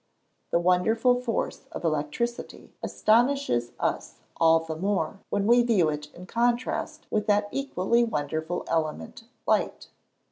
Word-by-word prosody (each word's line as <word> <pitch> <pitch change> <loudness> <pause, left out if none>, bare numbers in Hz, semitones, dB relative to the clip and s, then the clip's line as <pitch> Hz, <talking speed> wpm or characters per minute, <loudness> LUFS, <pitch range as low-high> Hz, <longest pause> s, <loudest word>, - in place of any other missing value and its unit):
The - - +2
wonderful 220 +8 +3
force 235 -3 -3
of - - -6
electricity 160 +10 -3
astonishes 230 - +2
us - - -2 0.2
all 165 0 +5
the 160 -1 -5
more 190 0 -1
when 200 -1 0
we 240 +2 +6
view 215 -9 +3
it 150 0 -5
in 180 - -10
contrast 240 +4 -1
with 210 -1 0
that 205 0 +3
equally 240 -4 +1
wonderful 160 -3 -2
element, 155 - -3 0.2
light. - - 0
195 Hz, 130 wpm, -26 LUFS, 160-235 Hz, 0.2 s, we